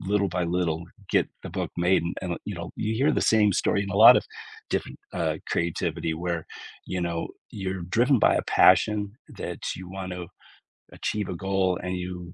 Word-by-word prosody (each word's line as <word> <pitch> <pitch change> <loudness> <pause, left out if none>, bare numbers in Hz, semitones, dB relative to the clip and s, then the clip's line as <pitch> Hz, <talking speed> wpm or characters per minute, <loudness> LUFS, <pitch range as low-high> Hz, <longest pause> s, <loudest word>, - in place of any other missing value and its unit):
little 100 0 +1
by 90 0 -1
little 85 -1 -1 0.3
get - - +3
the - - -7
book - - -3
made, 90 +2 +3 0.2
and 90 - -3
li - - -4
you 105 - -3
know, 85 -1 -6
you 110 +1 -1
hear 140 +6 +3
the - - +1
same 105 -2 +4
story 100 - +1
in 100 - -5
a 100 - -2
lot 110 +3 +10
of - - +1 0.5
different, - - -2 0.2
uh, 80 -3 -1
creativity 85 -1 -1
where, 85 0 -3 0.4
you 95 - -3
know, 85 -1 -2 0.2
you're 95 -2 -4
driven 120 +9 +3
by - - +4
a - - +1
passion 105 -1 +4 0.3
that - - -5 0.2
you 90 0 -9
want 95 -1 -5
to 90 -1 -6 0.7
achieve 105 -3 -3
a 90 - -3
goal, 95 0 0
and 90 0 -3
you 90 -1 -6
90 Hz, 195 wpm, -26 LUFS, 85-100 Hz, 0.7 s, lot